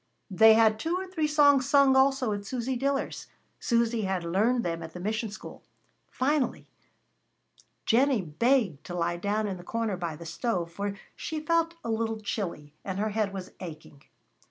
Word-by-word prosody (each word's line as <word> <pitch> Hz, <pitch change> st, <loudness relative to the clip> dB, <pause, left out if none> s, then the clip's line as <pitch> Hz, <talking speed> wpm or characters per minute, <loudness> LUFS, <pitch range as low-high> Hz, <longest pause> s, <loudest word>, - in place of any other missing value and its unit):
They 220 Hz, +4 st, +7 dB
had 220 Hz, -1 st, +4 dB
two 330 Hz, +8 st, -1 dB
or 375 Hz, +1 st, -3 dB
three 350 Hz, -5 st, -1 dB
songs 285 Hz, -3 st, +4 dB
sung 280 Hz, -2 st, +5 dB
also 265 Hz, -4 st, +3 dB
at 205 Hz, 0 st, -4 dB
Susy 255 Hz, +4 st, -3 dB
Diller's. 275 Hz, +2 st, -2 dB, 0.3 s
Susy 235 Hz, -1 st, +1 dB
had 190 Hz, -3 st, -1 dB
learned 215 Hz, +8 st, +1 dB
them 165 Hz, -1 st, -2 dB
at 165 Hz, -1 st, -8 dB
the 180 Hz, -, -7 dB
mission 220 Hz, +4 st, -2 dB
school. 205 Hz, -, -10 dB, 0.5 s
Finally 280 Hz, 0 st, 0 dB, 1.2 s
Jennie 250 Hz, -2 st, +3 dB
begged 195 Hz, -, +1 dB
to 175 Hz, -, -5 dB
lie 170 Hz, 0 st, -1 dB
down 205 Hz, +4 st, -1 dB
in 195 Hz, -3 st, -3 dB
the 175 Hz, -, -11 dB
corner 220 Hz, 0 st, -2 dB
by 170 Hz, -3 st, -4 dB
the 170 Hz, +2 st, -10 dB
stove, 170 Hz, 0 st, -2 dB
for 200 Hz, +3 st, -4 dB, 0.2 s
she 315 Hz, -, -4 dB
felt 330 Hz, +2 st, +1 dB
a 230 Hz, -, -2 dB
little 225 Hz, 0 st, -1 dB
chilly, 175 Hz, -8 st, -4 dB
and 190 Hz, -1 st, -4 dB
her 215 Hz, +2 st, 0 dB
head 210 Hz, -1 st, -1 dB
was 190 Hz, -2 st, -7 dB
aching. 155 Hz, -5 st, -10 dB
220 Hz, 175 wpm, -28 LUFS, 180-265 Hz, 1.2 s, They